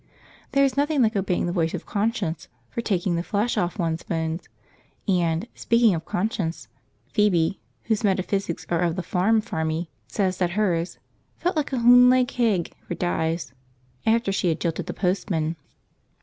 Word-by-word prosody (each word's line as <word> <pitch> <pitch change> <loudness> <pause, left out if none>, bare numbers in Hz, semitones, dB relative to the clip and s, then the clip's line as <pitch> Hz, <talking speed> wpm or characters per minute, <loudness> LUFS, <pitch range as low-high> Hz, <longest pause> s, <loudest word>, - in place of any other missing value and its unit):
There 275 0 +5
is 270 - 0
nothing 290 -1 +2
like 220 -1 +1
obeying 185 -2 0
the 175 - -1
voice 165 -1 0
of 175 - -6
conscience 205 -6 -1 0.2
for 235 - -2
taking 185 -5 0
the 170 - 0
flesh 210 +6 0
off 175 +2 -1
one's 165 -2 -1
bones; 160 +1 -3 0.6
and, 175 +1 +1
speaking 230 -3 +3
of 165 -1 -3
conscience, 175 - -2 0.5
Phoebe, 190 -4 +2 0.2
whose 220 -2 0
metaphysics 195 -2 0
are 170 - +1
of 170 -2 +1
the 185 - -3
farm 215 +6 +2
farmy, 160 -5 -2 0.2
says 190 -3 -1
that 175 -2 +1
hers 180 -5 0 0.4
"felt 355 +1 -1
like 300 -3 -1
a 265 - 0
hunlaid 250 +2 +6
hegg 215 -8 +1
for 175 - -5
dyes" 165 -4 -1 0.5
after 225 -2 +2
she 195 -2 +1
had 160 - 0
jilted 165 -2 -2
the - - -3
postman. 175 -4 0
185 Hz, 165 wpm, -24 LUFS, 170-225 Hz, 0.6 s, hunlaid